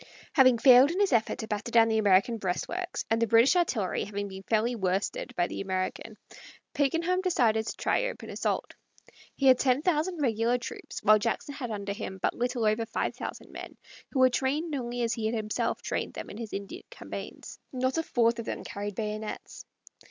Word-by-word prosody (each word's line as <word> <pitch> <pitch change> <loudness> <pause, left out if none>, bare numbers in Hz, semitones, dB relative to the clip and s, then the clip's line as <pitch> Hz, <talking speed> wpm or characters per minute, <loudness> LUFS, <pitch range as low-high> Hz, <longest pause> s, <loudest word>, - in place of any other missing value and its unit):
Having 255 -4 +6
failed 255 +2 +7
in 350 +4 -2
his 400 -8 +2
effort 225 -2 +2
to 220 - -5
batter 210 +2 -3
down 230 -1 +5
the 220 -1 +1
American 205 +3 +3
breastworks, 345 - -3
and 225 +1 +2
the 230 - +3
British 230 - +5
artillery 245 - 0
having 205 0 -4
been 190 -1 -8
fairly 225 +4 0
worsted 190 -2 -2
by 175 - +2
the - - -5
American, 190 +3 -3 0.6
Pakenham 330 +5 +1
decided 230 - +2
to - - -4
try - - +1
open - - -6
assault. - - -2 0.6
He 275 - -2
had 260 -1 +7
ten 260 +2 +2
thousand 340 0 0
regular 235 -2 +1
troops, 240 - -8
while 215 0 +6
Jackson 230 +6 -2
had 260 -4 -5
under 200 -2 -3
him 200 -2 -6
but - - 0
little 245 -1 -1
over 215 +1 +1
five - - -2
thousand - - -7
men, - - -9 0.3
who - - -4
were 255 0 +6
trained 295 +6 -1
only 245 -3 -2
as 230 0 0
he 225 -3 -2
had 225 - -1
himself 215 -1 -2
trained - - -3
them - - -7
in 205 - -9
his 225 -2 -6
Indian 200 0 -6
campaigns. - - -8
Not 260 +4 0
a - - +2
fourth 235 -6 +1
of 230 - -5
them - - -4
carried 205 0 -5
bayonets. 215 0 -5
230 Hz, 195 wpm, -28 LUFS, 215-265 Hz, 0.6 s, failed